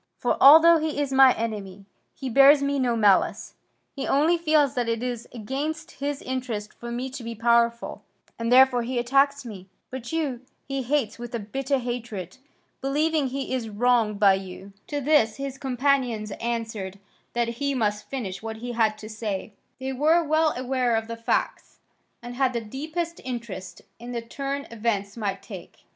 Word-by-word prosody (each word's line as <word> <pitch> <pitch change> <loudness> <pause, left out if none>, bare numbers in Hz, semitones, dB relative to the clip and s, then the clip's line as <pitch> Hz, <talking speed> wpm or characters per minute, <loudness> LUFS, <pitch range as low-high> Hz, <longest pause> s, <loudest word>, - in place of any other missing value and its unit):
For, - - 0
although 325 +4 +9
he 310 -1 -2
is 280 -2 -1
my 265 -1 +8
enemy, 205 -4 -5 0.3
he 270 - -6
bears 275 +3 +6
me 280 0 0
no 245 -2 +1
malice, 205 -4 +2 0.4
he 275 - -4
only 305 +5 +3
feels 310 -4 +2
that 240 -2 -1
it 230 +1 -1
is 245 -2 -4
against 295 +8 -4
his 285 0 -4
interest 245 -5 -4
for 235 - -9
me 245 +2 -3
to 260 -2 -7
be 230 0 -5
powerful 235 +1 +1 0.4
and 230 +1 -1
therefore 255 -1 +6
he 245 +2 -3
attacks 275 +3 +2
me. 195 -5 -9 0.2
But 255 -2 -6
you 295 -7 -2 0.3
he 275 0 -2
hates 250 -4 -1
with 240 0 -6
a - - -2
bitter 270 +6 -2
hatred, 235 -6 -5 0.4
believing 295 +2 +1
he 270 +1 -4
is 240 -4 -2
wronged 220 -1 +2
by 200 -2 +6
you." 190 +1 -7
To 290 -1 -3
this 275 -7 +3
his 275 -1 -6
companions 255 -5 0
answered 225 -5 -3 0.4
that 235 0 -1
he 280 -1 0
must 210 -3 -1
finish 195 -8 -4
what 220 0 -5
he 245 +2 -5
had 220 -2 +1
to 215 - -9
say; 215 -2 -5 0.3
they 265 0 -3
were 315 +6 +3
well 315 0 +2
aware 255 -2 0
of 225 0 -2
the 230 - -5
facts, 230 0 -2 0.5
and 240 0 -7
had 260 0 +1
the 235 - -2
deepest 315 +9 -5
interest 230 -7 -6 0.2
in 240 +1 -7
the 235 - -2
turn 275 +4 -4
events 210 -3 -2
might 200 -3 -3
take. 190 -4 -11
245 Hz, 175 wpm, -25 LUFS, 225-275 Hz, 0.5 s, although